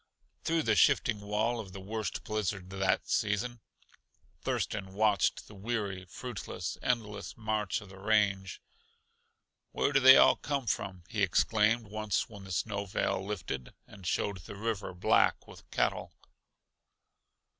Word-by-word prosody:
Through 165 -1 +1
the 110 -5 +2
shifting 105 +1 +4
wall 110 +4 0
of 100 -4 -7
the 95 - -7
worst 110 +3 -4
blizzard 100 -3 -3
that 95 -1 0
season 115 +4 0 0.8
Thurston 95 -3 -2
watched 105 -4 +2
the - - -13
weary, 100 -3 -3
fruitless, 95 -3 -5
endless 110 -4 -2
march 110 -2 -1
of 100 - -12
the 95 0 -12
range. 100 -2 +1 1.1
"Where 145 - +1
do 140 - +6
they 130 0 +10
all - - +7
come 140 -3 -2
from?" 95 -4 -2
he 110 -3 -3
exclaimed 110 +4 +3
once 105 -1 -1
when 100 -3 -11
the 95 - -9
snow 100 +3 -1
veil 95 - -1
lifted 85 -11 -5
and 95 -4 -11
showed 100 +3 0
the 100 +3 -10
river 105 -3 -3
black 90 - +3
with - - -14
cattle. - - 0
105 Hz, 140 wpm, -31 LUFS, 95-110 Hz, 1.1 s, they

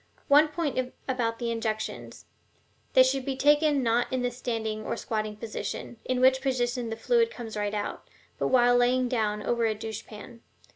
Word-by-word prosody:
One 295 +2 +7
point 290 -5 -2 0.2
about 235 -3 -1
the 235 -1 -2
injections: 220 -1 -4 0.7
they 260 - +8
should 260 +1 0
be 270 0 -2
taken 290 0 +3
not 235 +1 +1
in 255 -1 -1
the 245 - 0
standing 225 -3 -3
or - - -3
squatting 215 -1 -3
position 215 +1 -6
(in 255 -1 0
which 260 +1 +4
position 245 -3 -1
the 225 - -3
fluid 465 - +2
comes 230 - -8
right 205 0 -2
out), 205 - -4 0.3
but - - +1
while 245 -1 +4
laying 250 +1 +3
down, 215 -4 -1
over 235 -1 +1
a 215 - -1
douche 220 0 -6
pan. 230 +2 -11
245 Hz, 180 wpm, -27 LUFS, 220-260 Hz, 0.7 s, they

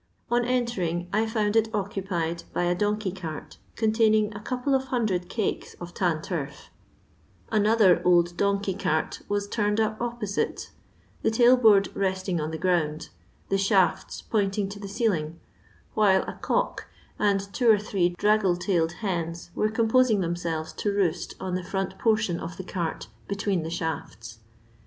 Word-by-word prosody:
On 240 0 +3
entering 235 -9 -1
I 220 +1 +2
found 215 -1 0
it 225 0 +3
occupied 185 -4 -2
by - - 0
a 175 0 +2
donkey 205 +1 -1
cart, 165 -5 -7 0.2
containing 220 -1 +2
a 200 - -7
couple 255 +5 -2
of 265 0 +2
hundred 215 -9 -1
cakes 220 -3 -3
of 175 0 -9
tan 165 -4 0
turf; 155 -7 -5 0.8
another 215 -3 +4
old 175 -1 +3
donkey 200 0 0
cart 160 -5 -1
was 205 0 -1
turned 210 0 0
up 215 0 0
opposite, 235 -4 -3 0.5
the - - +2
tailboard 225 -3 +5
resting 190 -3 -1
on 155 - -2
the 160 - -4
ground, 160 -4 0 0.4
the 195 - +1
shafts 195 -1 +1
pointbg 200 -2 0
to 205 - -8
the 200 - -6
ceiling, 175 -7 -1 0.5
while 195 -3 +4
a - - -6
cock - - -1 0.3
and 200 -1 +1
two 240 +1 +2
or 220 - +7
three 195 -3 0
draggle 205 -3 +3
tailed 175 -3 0
hens 170 -2 -3
were 215 - +1
composing 225 0 +3
themselyes 170 -2 -3
to 205 - 0
roost 195 -5 -1
on 185 - -4
the 180 0 -2
front 190 +1 -3
portion 215 -6 +1
of 170 +1 -7
the 190 - -5
cart 175 -3 -3 0.2
between 200 -2 -1
the 160 - -4
shafts. 145 -9 -5
195 Hz, 155 wpm, -26 LUFS, 175-215 Hz, 0.8 s, or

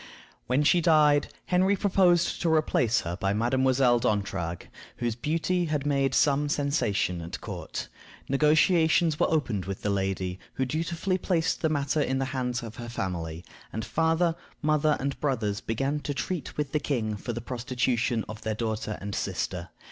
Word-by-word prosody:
When 130 +4 +2
she 175 +4 +4
died, 150 -3 +4 0.2
Henry 185 +2 +3
proposed 185 -3 +2
to 165 - +2
replace 125 -7 +2
her 85 0 -4
by 95 +1 0
Mademoiselle 125 +2 +3
D'Entragues, 100 -6 -1 0.3
whose 120 -1 -1
beauty 165 +7 0
had 150 -3 -1
made 135 -2 +1
some 145 0 +3
sensation 120 - 0
at 85 +1 -6
court. - - -6 0.4
Negotiations 160 +2 +3
were - - +3
opened 125 - 0
with 95 0 -5
the 105 - +1
lady, 95 -2 -2 0.2
who 130 - 0
dutifully 165 +6 -1
placed 170 -3 0
the 160 - +2
matter 145 0 0
in 135 -2 0
the 135 - 0
hands 125 -2 -2
of 115 -1 -8
her 120 -1 -6
family, 85 -6 -4 0.3
and 110 0 -4
father, 165 +1 +2 0.3
mother, 155 0 +3
and 140 +1 -3
brothers 110 -8 -1
began 135 +6 -1
to 145 -1 -4
treat 150 +5 -4
with 145 -2 -2
the 150 - +1
king 115 -8 -1
for 110 +4 -5
the 120 - -4
prostitution 125 -1 -1
of 110 +1 -8
their 110 -1 -2
daughter 110 -1 -3
and 100 +1 -5
sister. - - -3
135 Hz, 165 wpm, -27 LUFS, 110-155 Hz, 0.4 s, she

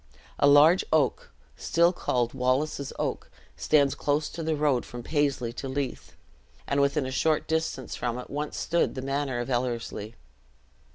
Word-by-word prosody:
A - - +5
large 150 +6 +6
old 155 -2 +6
oak, - - -23 0.2
still 170 +1 +2
called 120 -8 -1
Wallace's 135 +2 0
Oak, - - -3 0.3
stands 145 -3 +3
close 145 +1 -1
to 165 - -7
the 160 -1 0
road 145 -4 +1
from 120 0 -9
Paisley 140 -5 0
to 135 +2 -6
Leith, 135 -1 -4 0.5
and 140 0 +1
within 140 0 +1
a 130 - -4
short 155 +4 +1
distance 160 -5 -2
from 120 -1 -3
it 125 - -8
once 145 +1 -4
stood 170 +1 0
the 130 - -5
manor 135 -1 -2
of 120 - -3
Ellerslie. 120 -3 -3
140 Hz, 165 wpm, -27 LUFS, 125-150 Hz, 0.5 s, large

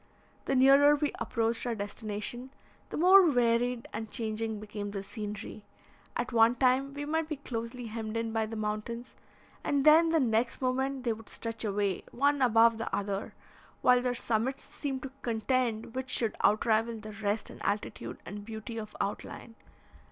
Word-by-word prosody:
The 270 - +1
nearer 275 +3 +7
we 295 -1 0
approached 230 +1 -1
our 235 - -1
destination, 210 +4 -5 0.4
the - - -4
more 365 +1 +7
varied 245 -1 +1
and 220 -1 -4
changing 220 -2 -3
became 205 -1 -5
the 200 -1 -5
scenery. 210 0 -7 0.5
At 245 - -2
one 230 +1 +5
time 265 +2 +2
we 290 0 -4
might 320 +1 -1
be 305 - -1
closely 245 -2 -5
hemmed 220 0 -4
in 230 -1 -2
by 220 -1 0
the 225 - -6
mountains, 215 +3 -4 0.5
and 280 -1 +1
then 320 +2 +7
the 325 0 +3
next 235 -2 +1
moment 265 +1 -1
they 235 -2 +1
would 220 0 -11
stretch 230 -1 -5
away, 200 -3 0
one 285 +2 +2
above 230 -2 +5
the 225 - -3
other, 200 0 -3 0.5
while 250 0 +6
their 250 0 -1
summits 240 +4 -1
seemed 270 -3 -5
to 270 - -6
contend 230 0 -1
which 260 0 -4
should 230 -3 0
outrival 225 +2 +3
the 215 0 -8
rest 205 +1 -2
in - - -12
altitude 205 +1 -3
and 205 +1 -7
beauty 225 +1 -6
of 215 -1 -8
outline. 205 +3 -4
230 Hz, 165 wpm, -30 LUFS, 215-260 Hz, 0.5 s, nearer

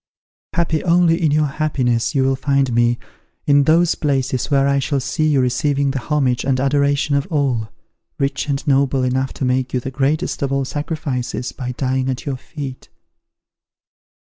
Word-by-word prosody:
Happy 165 -2 0
only 170 -1 +3
in 160 - +3
your 150 +1 +2
happiness, 135 -4 0
you 135 - +3
will 135 0 +2
find 135 -1 +1
me, 120 0 +2 0.5
in 145 -1 +4
those 170 +3 +4
palaces 135 -4 -1
where 140 -1 +3
I 140 0 +2
shall 140 +1 -1
see 155 +4 -1
you 145 -3 +3
receiving 140 +2 +1
the 135 - -2
homage 130 -3 0
and 130 -1 +1
adoration 140 +1 +1
of 140 -1 +1
all, 130 -8 0 0.5
rich 140 +1 -1
and 140 +1 -2
noble 135 -2 +2
enough 130 +1 0
to 135 - -3
make 130 0 0
you - - +2
the 130 +2 -6
greatest 140 +3 -1
of 140 -1 -1
all 135 -1 0
sacrifices, 145 -4 -3
by 125 -2 -5
dying 130 0 -1
at 130 -1 -4
your 140 -3 -2
feet." 135 -1 -8
140 Hz, 170 wpm, -19 LUFS, 130-145 Hz, 0.5 s, in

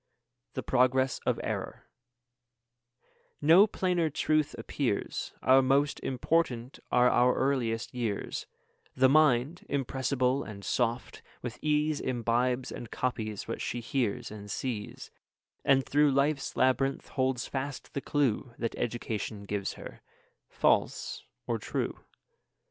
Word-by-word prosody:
THE - - -3
PROGRESS 130 +1 +2
OF - - +2
ERROR - - -4 1.5
No 170 +8 +7
plainer 180 -5 0
truth 155 +1 +1
appears, - - -2
Our 130 +1 +6
most 140 +2 +2
important 130 -2 -1
are 125 0 +5
our 125 0 +4
earliest 120 -5 0
years; 115 -5 -3 0.5
The 130 0 +5
mind, 150 +1 +3
impressible 130 -1 0
and 100 -2 -9
soft, 120 0 -1 0.2
with 120 -1 -5
ease 150 0 +1
Imbibes 125 +1 0
and 120 - -7
copies 110 -5 -3
what 115 - -4
she 120 - -2
hears 120 -3 -2
and 105 -1 -9
sees, 110 -3 -4 0.5
And 135 -1 +4
through 150 +1 +4
life's 140 +1 +1
labyrinth 135 +1 +1
holds 130 -2 0
fast 135 0 -5
the 140 - -2
clue 140 -7 +1
5 - - -27
That 115 - -2
education 110 -3 -3
gives 100 -1 -3
her, - - -10 0.5
false - - +1 0.2
or - - -1
true. - - -3
130 Hz, 120 wpm, -30 LUFS, 120-140 Hz, 1.5 s, No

